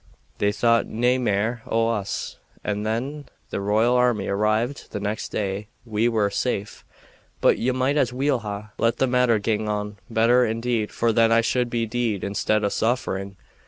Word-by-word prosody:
They 100 - +2
thought 115 +2 +2
nae 125 +3 +1
mair 110 0 0
o' 115 0 +1
us, 105 -4 -3 0.2
and 105 0 -2
when 130 +7 -3 0.3
the - - -2
royal 110 +5 +2
army 125 -5 +2
arrived 110 +6 0
the - - -3
next 105 +2 -3
day 100 0 -3 0.2
we 115 +1 +1
were 105 -3 +1
safe; 105 -2 -2 0.6
but - - +3
ye 125 - +1
might 130 +3 +1
as 130 -4 +2
weel 135 +1 +1
ha' 105 -1 -6
let 115 +1 +2
the - - +3
matter 125 -2 +3
gang 105 0 -1
on 105 0 -3
better, 115 +2 +4
indeed, 115 -1 -1
for 115 -1 +1
then 115 0 +4
I 115 0 +5
should 120 +1 0
be 115 -1 0
deed 115 -3 -1
instead 105 +2 0
o' - - +2
suffering. 100 -4 -1
115 Hz, 175 wpm, -24 LUFS, 105-120 Hz, 0.6 s, I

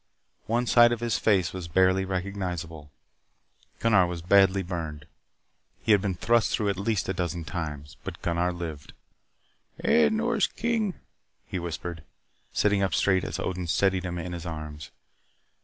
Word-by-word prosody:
One 120 +2 +1
side 120 0 +6
of 120 - -1
his 120 -1 0
face 95 -6 +2
was 90 -2 -5
barely 95 +2 +3
recognizable. 90 -5 -4 0.9
Gunnar 105 -6 +4
was 85 -1 -5
badly 95 +1 +4
burned. 80 -4 -5 0.8
He 110 - +2
had 105 -2 +6
been 95 -2 -1
thrust 115 +5 +2
through 105 -2 +1
at 100 - -1
least 105 -1 0
a 95 - 0
dozen 85 -2 -3
times. 75 -2 -6
But - - -6
Gunnar 85 +1 +1
lived. 85 -5 -7 0.9
"Eh, 75 -2 +5
Nors - - +1
King," 225 -5 -1 0.5
he 95 - -4
whispered, 85 0 -5 0.5
sitting 105 -1 +2
up 95 -6 +1
straight 95 +1 +2
as 80 - -4
Odin 90 -2 -3
steadied 95 +2 +2
him 90 0 -3
in 90 +1 -5
his 85 0 -6
arms. 75 -3 -7
90 Hz, 155 wpm, -27 LUFS, 85-100 Hz, 0.9 s, side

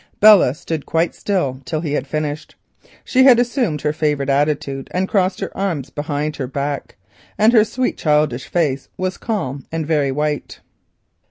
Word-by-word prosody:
Belle 205 -11 +7
stood 160 -2 -5
quite 165 +1 +1
still 140 -10 -2
till 155 +3 -3
he 155 -4 -3
had 135 -2 -2
finished. 155 +1 -4 0.5
She 260 0 +3
had 255 -3 +8
assumed 240 - 0
her 150 0 0
favourite 150 -3 0
attitude 140 -1 0
and 185 +1 +1
crossed 190 -2 +1
her - - -5
arms 170 -9 -2
behind 150 0 -3
her 130 - -3
back, 140 +1 -4 0.4
and 220 +3 +4
her 220 -3 +7
sweet 250 +3 -2
childish 150 -4 +1
face 145 -6 -1
was 185 0 -3
calm 140 - -3
and 160 -1 -2
very 145 -3 +1
white. 150 +1 -3
150 Hz, 165 wpm, -19 LUFS, 140-185 Hz, 0.5 s, had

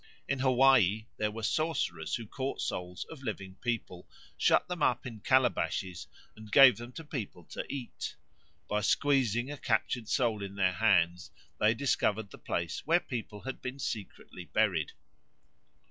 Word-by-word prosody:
In 135 0 -1
Hawaii 130 -6 +4
there 105 - 0
were 110 +1 -7
sorcerers 110 - 0
who 115 - -5
caught 130 +5 -4
souls 90 0 -4
of 155 -4 -10
living 100 -6 -5
people, 115 -7 -3 0.3
shut - - +3
them 180 -3 -5
up 125 -4 +2
in 115 -4 -7
calabashes, 115 -7 +1 0.3
and 110 -1 -12
gave 135 0 +8
them 120 +1 -8
to 165 - -7
people 110 - -6
to - - -4
eat. 135 -4 -5 0.5
By 105 0 0
squeezing 125 +1 +2
a 145 - -6
captured 115 -2 -1
soul 115 -6 +1
in 100 0 -6
their 95 -2 +2
hands 90 -5 +2 0.3
they 110 +2 +4
discovered 110 -5 0
the - - -12
place 85 0 -2
where 170 +2 +5
people 110 - -6
had 130 0 -6
been 130 +2 -5
secretly 105 -8 -6
buried. 85 -3 +1
110 Hz, 155 wpm, -31 LUFS, 100-130 Hz, 0.5 s, gave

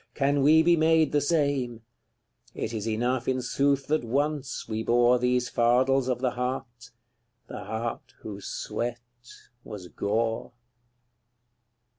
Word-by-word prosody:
can 140 0 +1
we 155 +3 +6
be 170 +1 +5
made 160 -1 +3
the 145 - +2
same: 140 -6 0 0.7
It - - -4
is 110 -1 -3
enough, 120 +3 -1
in 130 0 +1
sooth, 140 +2 +1
that 155 -2 0
ONCE 140 +3 -2
we 110 0 -3
bore 120 +2 +3
These 125 0 +1
fardels 130 +2 +2
of 125 -1 -1
the 130 -2 +1
heart 125 0 -5 0.6
the - - -8
heart 115 +1 -5
whose 100 -2 -8
sweat 120 0 -3 0.7
was 95 -5 -9
gore. 115 +3 -2
125 Hz, 130 wpm, -27 LUFS, 115-140 Hz, 0.7 s, we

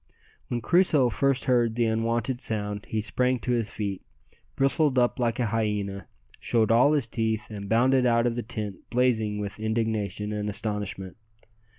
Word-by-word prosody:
When 120 -1 -2
Crusoe 155 - +3
first 135 +2 +1
heard 120 -4 +2
the 120 -1 +2
unwonted 115 +2 -1
sound 105 -3 -3
he 110 - -1
sprang 125 +4 +1
to 125 - -2
his 115 -4 0
feet, 100 -3 -4 0.5
bristled 135 0 +2
up 120 0 +2
like 120 -1 0
a 120 - +2
hyena, 105 -4 -2 0.3
showed 115 -2 +1
all 125 +6 +5
his 145 -5 +1
teeth, 110 -1 -2
and 100 -2 -7
bounded 125 +3 +3
out 115 0 +3
of 120 -1 0
the 120 - -2
tent 105 -4 -6
blazing 115 -4 +1
with 105 0 -5
indignation 110 -2 -2
and 105 0 -2
astonishment. 105 -3 -4
115 Hz, 165 wpm, -26 LUFS, 105-125 Hz, 0.5 s, all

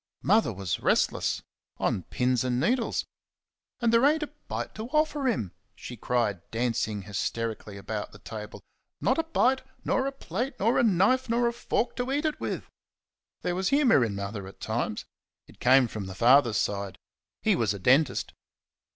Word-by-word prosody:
Mother 215 - +3
was 95 -3 -3
restless - - +1 0.3
"on - - 0
pins 125 +6 0
and 125 -1 0
needles." 235 - +1 0.7
"And 235 -2 +2
there 230 +2 +5
ain't 305 +2 +4
a 295 - -7
bite - - -4
to 220 +2 -6
offer 300 -1 +1
him," 115 - 0 0.2
she 125 - -8
cried, 115 -5 0
dancing 115 -3 -1
hysterically 105 +1 -3
about 105 +1 -5
the - - -13
table 105 +1 -8 0.4
"not - - +1
a - - +2
bite; 265 -5 +2 0.2
nor 265 +1 +1
a - - -1
plate, 250 - -4
nor 225 +5 +3
a - - +4
knife, 225 +5 +3
nor 235 +1 +2
a 235 - 0
fork 235 0 -1
to 250 +1 -2
eat 290 +3 0
it 310 - -1
with!" - - -4 0.8
There 180 - 0
was 185 +1 0
humour 265 - +4
in 110 -4 -2
Mother 100 0 -5
at 95 - -13
times. 110 -1 -2 0.4
It - - -19
came 130 0 +5
from 105 -4 -6
the 95 - -7
father's 120 0 +5
side. 100 -1 -2 0.5
He - - +4
was 115 -4 +1
a - - -5
dentist. 130 +7 +2
130 Hz, 175 wpm, -27 LUFS, -, 0.8 s, there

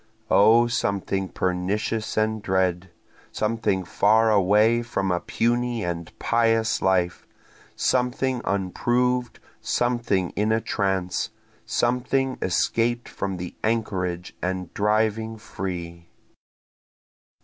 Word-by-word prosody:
(O 110 +4 +6
something 100 -4 -1
pernicious 100 +5 -2
and 110 0 +1
dread! 95 -1 0 0.4
Something 110 -3 0
far 110 +5 +3
away 105 +4 +4
from 100 -5 -2
a 90 - +1
puny 120 +1 0
and 85 -1 -4
pious 115 -1 +1
life! 90 -2 +1 0.5
Something 125 0 0
unproved! 120 +6 0 0.2
something 120 -7 0
in 105 +1 0
a 110 - +3
trance! 95 -4 -1 0.4
Something 125 +2 0
escaped 115 +6 0
from 95 -2 -4
the 90 0 -6
anchorage 95 -6 -2
and 90 -1 -3
driving 110 +1 0
free.) 85 -5 -6
105 Hz, 95 wpm, -24 LUFS, 95-115 Hz, 0.5 s, O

